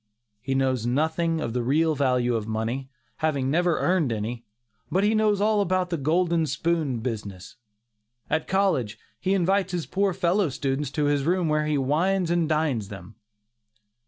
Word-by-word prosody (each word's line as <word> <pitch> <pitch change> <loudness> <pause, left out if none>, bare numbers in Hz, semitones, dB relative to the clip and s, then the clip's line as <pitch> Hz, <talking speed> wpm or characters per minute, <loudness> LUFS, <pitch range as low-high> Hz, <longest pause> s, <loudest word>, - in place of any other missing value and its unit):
He 135 +4 -2
knows 130 -3 0
nothing 160 +5 0
of 115 -7 -3
the 125 - 0
real 155 +6 +2
value 125 -4 +1
of 110 -2 -2
money, 115 +5 -3 0.3
having 140 -4 0
never 175 +1 +2
earned 175 -8 +1
any; 115 +2 -4 0.5
but 190 +2 +2
he 210 +2 +3
knows 215 -2 +2
all 210 0 +2
about 185 -1 0
the 170 - 0
"golden 165 +2 +1
spoon" 150 -4 -1
business. 105 -6 -6 0.7
At 160 - -1
college, 180 - +1 0.2
he 190 +1 +1
invites 190 +1 +1
his 175 -3 -2
poor 195 0 0
fellow 185 0 +1
students 135 +1 -2
to 150 - 0
his 145 -1 +1
room 175 -1 +1
where 150 0 +1
he 150 -1 +1
"wines 170 +7 +1
and 170 -2 +1
dines" 150 -9 0
them. 100 0 -10
155 Hz, 165 wpm, -25 LUFS, 130-180 Hz, 0.7 s, he